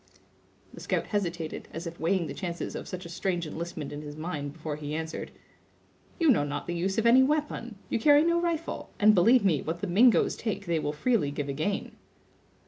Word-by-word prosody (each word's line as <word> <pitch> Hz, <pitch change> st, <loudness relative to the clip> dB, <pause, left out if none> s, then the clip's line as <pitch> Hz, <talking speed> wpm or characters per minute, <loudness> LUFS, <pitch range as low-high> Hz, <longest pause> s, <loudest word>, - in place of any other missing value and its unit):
The -, -, -10 dB
scout -, -, -1 dB
hesitated, 175 Hz, -6 st, -3 dB
as 165 Hz, +2 st, -6 dB
if 170 Hz, 0 st, -7 dB
weighing 170 Hz, +2 st, +1 dB
the 140 Hz, -, -5 dB
chances 170 Hz, +2 st, -4 dB
of -, -, -6 dB
such 185 Hz, -1 st, -6 dB
a -, -, -6 dB
strange 175 Hz, -1 st, -2 dB
enlistment 160 Hz, -1 st, -5 dB
in 145 Hz, -, -6 dB
his 150 Hz, -1 st, -8 dB
mind 150 Hz, -3 st, -4 dB
before 155 Hz, -1 st, -5 dB
he 150 Hz, 0 st, -5 dB
answered: 160 Hz, 0 st, -4 dB, 0.9 s
"You 325 Hz, -4 st, +5 dB
know 200 Hz, -, +3 dB
not 145 Hz, 0 st, -4 dB
the 175 Hz, -, -3 dB
use 190 Hz, +4 st, -1 dB
of 225 Hz, -, +1 dB
any 240 Hz, +3 st, +7 dB
we'pon. 290 Hz, -5 st, 0 dB
You -, -, -1 dB
carry 290 Hz, +5 st, +6 dB
no 340 Hz, +1 st, +2 dB
rifle; 335 Hz, -2 st, -2 dB
and 215 Hz, +1 st, +7 dB
believe 215 Hz, +4 st, +5 dB
me, 160 Hz, -7 st, +3 dB
what 165 Hz, +2 st, -4 dB
the -, -, -1 dB
Mingoes 215 Hz, +7 st, +4 dB
take 205 Hz, -3 st, -3 dB
they 170 Hz, -2 st, 0 dB
will 150 Hz, -, -1 dB
freely 175 Hz, -, +1 dB
give 145 Hz, 0 st, -4 dB
again." 155 Hz, +9 st, -2 dB
175 Hz, 205 wpm, -28 LUFS, 155-225 Hz, 0.9 s, any